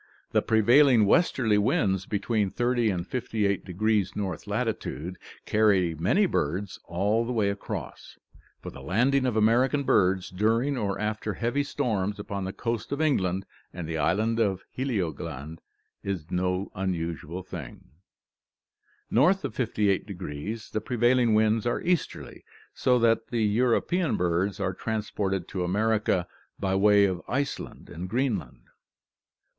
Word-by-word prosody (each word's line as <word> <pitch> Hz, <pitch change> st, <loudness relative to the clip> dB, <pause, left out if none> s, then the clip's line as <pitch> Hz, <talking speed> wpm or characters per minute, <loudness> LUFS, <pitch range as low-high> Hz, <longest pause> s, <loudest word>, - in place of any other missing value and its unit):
The -, -, +3 dB
prevailing 120 Hz, +2 st, +5 dB
westerly 110 Hz, -, +3 dB
winds 95 Hz, -2 st, +1 dB
between 105 Hz, 0 st, 0 dB
300 120 Hz, +1 st, +1 dB
and 90 Hz, -1 st, -3 dB
58° 105 Hz, -3 st, 0 dB
north 95 Hz, -5 st, -4 dB
latitude 90 Hz, +5 st, -3 dB, 0.3 s
carry 100 Hz, -6 st, +3 dB
many 90 Hz, -, +2 dB
birds 95 Hz, -, -2 dB
all 100 Hz, +7 st, +1 dB
the 120 Hz, -, -4 dB
way 105 Hz, -4 st, +1 dB
across, 100 Hz, -, -7 dB, 0.5 s
for -, -, -6 dB
the -, -, -11 dB
landing 130 Hz, -, +2 dB
of 120 Hz, -, -1 dB
American 125 Hz, +6 st, +3 dB
birds 95 Hz, -6 st, +2 dB
during 115 Hz, +9 st, +1 dB
or 100 Hz, -6 st, -1 dB
after 105 Hz, -1 st, -2 dB
heavy 120 Hz, +7 st, 0 dB
storms 110 Hz, -9 st, -1 dB
upon 100 Hz, -1 st, -4 dB
the 95 Hz, -, -3 dB
coast 115 Hz, +2 st, -3 dB
of 140 Hz, -, -2 dB
England 95 Hz, -, +1 dB, 0.3 s
and 85 Hz, -2 st, -6 dB
the 80 Hz, -1 st, -3 dB
island 110 Hz, +8 st, +1 dB
of 95 Hz, -4 st, 0 dB
Heligoland 80 Hz, -, -3 dB, 0.4 s
is 95 Hz, -5 st, -4 dB
no 90 Hz, +2 st, -1 dB
unusual 85 Hz, -2 st, -3 dB
thing. 75 Hz, -9 st, -9 dB, 1.2 s
North 180 Hz, -, +3 dB
of -, -, -5 dB
58° 100 Hz, -, -2 dB
the 110 Hz, -, -2 dB
prevailing 120 Hz, 0 st, +2 dB
winds 110 Hz, +1 st, +2 dB
are 120 Hz, -, 0 dB
easterly, 175 Hz, -3 st, -2 dB, 0.3 s
so 125 Hz, -1 st, +2 dB
that 115 Hz, -1 st, +2 dB
the 115 Hz, -2 st, -1 dB
European 125 Hz, -, +1 dB
birds 90 Hz, +3 st, 0 dB
are 95 Hz, -1 st, -1 dB
transported 100 Hz, -3 st, -2 dB
to 95 Hz, -2 st, -2 dB
America 105 Hz, -1 st, +1 dB, 0.3 s
by 95 Hz, -1 st, 0 dB
way 100 Hz, +1 st, +5 dB
of 90 Hz, -2 st, -1 dB
Iceland 140 Hz, +1 st, -3 dB
and 90 Hz, +4 st, -6 dB
Greenland. 110 Hz, -, -2 dB
105 Hz, 130 wpm, -27 LUFS, 95-115 Hz, 1.2 s, prevailing